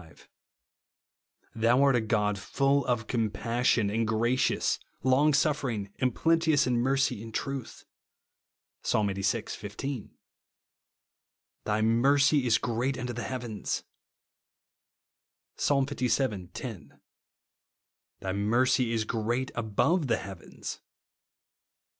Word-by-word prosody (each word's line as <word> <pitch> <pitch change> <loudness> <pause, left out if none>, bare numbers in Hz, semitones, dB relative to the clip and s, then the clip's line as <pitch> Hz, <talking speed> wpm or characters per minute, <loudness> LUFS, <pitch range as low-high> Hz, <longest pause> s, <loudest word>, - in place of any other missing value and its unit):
5); 80 - -18 0.6
" - - -43
thou 120 +4 +4
art 140 -2 +4
a 120 - +2
God 105 -2 0
full 140 +7 +1
of 120 -3 0
comjMSsion, 115 -1 0
and 115 0 0
gracious, 120 +3 +1 0.2
long 130 +4 +4
sufering, 135 -9 0
and 130 -3 +1
plenteous 165 -3 +3
in 125 -1 +1
mercy 130 -3 +1
and 115 0 -8
truth," 135 +3 -5 1.0
(Psa. - - 0
Ixxxvi. 100 +1 -1
15); 110 +4 -6 1.5
^'\hj 110 +1 +1
mercy 140 +4 +3
is 115 - +4
great 120 +4 -1
unto 125 0 -4
the 120 - -5
heavens," 120 -4 -4 1.7
(Psa. 145 - +2
Ivii. 130 - 0
10); 95 - -8 0.6
" - - -64
thy 95 -1 -2
mercy 120 +5 +2
is 110 -1 +1
great 115 +4 -2
above 120 - +1
the 115 - +2
heavens," 95 -3 -8
(Psa. - - -42
120 Hz, 110 wpm, -28 LUFS, 110-135 Hz, 1.7 s, thou